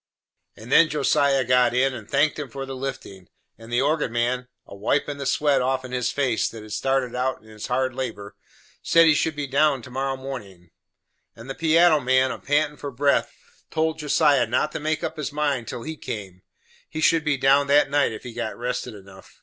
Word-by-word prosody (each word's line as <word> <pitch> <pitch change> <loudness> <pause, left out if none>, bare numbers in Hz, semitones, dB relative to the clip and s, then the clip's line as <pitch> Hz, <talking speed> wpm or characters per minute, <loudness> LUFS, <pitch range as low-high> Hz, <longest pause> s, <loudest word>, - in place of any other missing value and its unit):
And 115 +4 -11
then 165 -1 +6
Josiah 140 -2 +2
got 125 0 +3
in, 135 +1 +2
and 110 -4 -9
thanked 145 +2 +1
'em 145 -3 -5
for 135 +3 -6
the 135 0 -7
liftin'; 130 -9 -7 0.3
and 115 +1 -12
the 120 +1 +2
organ 150 -3 0
man, 125 +2 -1 0.2
a - - -13
wipin' 140 +8 -1
the 140 - -3
sweat 140 -1 +2
offen 130 0 -2
his 125 -1 -1
face 130 -5 0
that 115 -2 -10
had 110 - -12
started 130 +2 0
out 125 -1 -2
in 110 - -18
his 110 -1 -8
hard 130 +1 0
labor 110 -6 -6 0.5
said 165 0 +5
he 160 - +6
should 155 +1 0
be 145 -1 -3
down 140 -1 +2
to 130 - -11
morrow 135 +1 -2
mornin'; 100 -11 -9 0.6
and 115 +2 -12
the - - -3
piano 165 +1 +4
man, 130 0 +2
a - - -6
pantin' 150 +1 0
for 145 - -6
breath, 140 +2 +1 0.4
told 160 0 -1
Josiah 145 -4 +3
not 150 +6 0
to - - -4
make 155 +1 -2
up - - -4
his 150 -1 -4
mind 145 -5 -1
till 115 - -6
he 160 0 -5
came; 95 -9 -7 0.5
he 155 - -6
should 160 0 +3
be 150 -2 0
down 135 +2 +3
that 140 0 +4
night 145 -3 +2
if 110 - -8
he 125 - -8
got 120 - -4
rested 125 -1 -4
enough. 95 -1 -16
135 Hz, 210 wpm, -24 LUFS, 120-145 Hz, 0.6 s, then